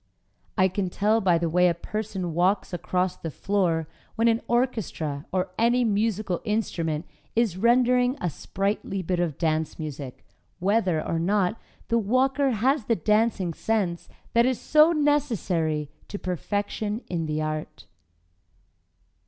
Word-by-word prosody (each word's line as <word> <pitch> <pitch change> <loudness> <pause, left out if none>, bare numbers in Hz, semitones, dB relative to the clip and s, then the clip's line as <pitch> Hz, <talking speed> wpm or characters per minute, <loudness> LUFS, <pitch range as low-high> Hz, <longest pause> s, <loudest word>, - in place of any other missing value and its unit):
I 185 -1 +5
can 190 0 -2
tell 215 +4 +2
by 180 -4 +4
the 170 0 0
way 180 +2 +4
a 170 - +2
person 190 -2 -4
walks 185 +4 +1
across 180 +1 -1
the 165 - -6
floor 170 -1 0 0.3
when 230 +1 +2
an 230 0 +3
orchestra 215 - -1
or 185 -1 -1
any 240 +2 +3
musical 210 -4 0
instrument 170 -8 -1 0.3
is 225 -6 +2
rendering 245 +4 +3
a 180 - -1
sprightly 195 +3 -2
bit 180 +1 -1
of 165 -5 -1
dance 160 -1 0
music, 145 -4 -7 0.3
whether 185 -4 +1
or 165 - 0
not 195 +4 +1 0.3
the 235 - +3
walker 265 +6 +2
has 255 +2 +1
the 230 - +2
dancing 210 -1 +1
sense 190 -4 -1 0.2
that 235 +1 +4
is 255 -2 0
so 305 +2 +5
necessary 220 - +1 0.2
to 205 - -5
perfection 205 - -3
in 165 -3 -2
the 155 0 -1
art. 155 0 -4
195 Hz, 140 wpm, -26 LUFS, 170-230 Hz, 0.3 s, I